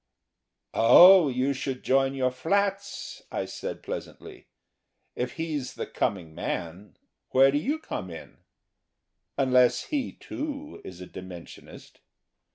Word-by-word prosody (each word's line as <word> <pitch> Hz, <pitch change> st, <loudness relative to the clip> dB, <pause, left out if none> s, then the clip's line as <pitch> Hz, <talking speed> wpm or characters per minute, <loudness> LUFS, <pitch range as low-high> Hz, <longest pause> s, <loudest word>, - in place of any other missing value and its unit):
"Oh, 175 Hz, +9 st, +8 dB
you 130 Hz, +2 st, 0 dB
should 130 Hz, -1 st, -5 dB
join 135 Hz, +1 st, +2 dB
your 130 Hz, -1 st, +1 dB
flats," 200 Hz, +9 st, -2 dB
I -, -, -2 dB
said, -, -, -7 dB
pleasantly. -, -, -8 dB, 0.7 s
"If 125 Hz, 0 st, -3 dB
he's 155 Hz, -5 st, -4 dB
the -, -, -4 dB
coming 85 Hz, -5 st, -3 dB
man, 85 Hz, +3 st, -5 dB, 0.3 s
where 135 Hz, +1 st, +5 dB
do 145 Hz, -, +1 dB
you 285 Hz, -, -1 dB
come 100 Hz, -, -6 dB
in?... 80 Hz, -, -11 dB, 1.0 s
Unless 125 Hz, -2 st, +3 dB
he, 280 Hz, -4 st, -2 dB
too, 295 Hz, 0 st, -7 dB
is 90 Hz, -1 st, -10 dB
a -, -, -7 dB
Dimensionist." 90 Hz, -2 st, -11 dB
135 Hz, 120 wpm, -27 LUFS, 105-180 Hz, 1.0 s, Oh